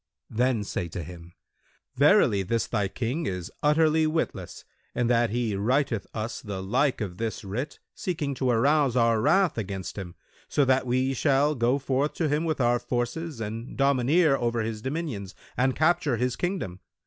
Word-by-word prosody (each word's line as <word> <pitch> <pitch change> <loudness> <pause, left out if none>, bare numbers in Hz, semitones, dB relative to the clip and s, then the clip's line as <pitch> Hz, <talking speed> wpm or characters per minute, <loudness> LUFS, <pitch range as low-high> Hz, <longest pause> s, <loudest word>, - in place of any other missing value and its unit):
Then 120 -1 +1
say 90 -3 -3
to 85 +1 -6
him, 85 +1 -11 0.6
'Verily, 140 - +5
this 115 +5 0
thy 105 -4 -1
King 125 - -3
is 90 -3 -4
utterly 155 +1 +3
witless 155 - -3 0.3
in 120 - +1
that 120 -1 +3
he 115 -2 -1
writeth 115 +1 0
us 110 +3 -4
the 100 -6 -5
like 125 +6 +1
of 95 -4 -5
this 115 0 -3
writ 110 +9 -4 0.2
seeking 155 -6 -3
to 130 -1 -1
arouse 135 +2 +3
our 115 -2 +3
wrath 185 - +3
against 95 -1 -5
him, 90 -3 -7 0.3
so 145 - +2
that 130 0 +2
we 130 +2 +1
shall 140 +2 +2
go 125 0 +2
forth 135 +1 0
to 165 - 0
him 150 +3 0
with 155 -3 -1
our 120 -1 +3
forces 125 +5 -3
and 115 +3 -6
domineer 140 +3 +3
over 120 -2 0
his 110 -1 -4
dominions 130 - -4 0.2
and 130 +1 +1
capture 160 -4 +2
his 125 +1 0
kingdom. 175 - -3
125 Hz, 170 wpm, -26 LUFS, 110-145 Hz, 0.6 s, Verily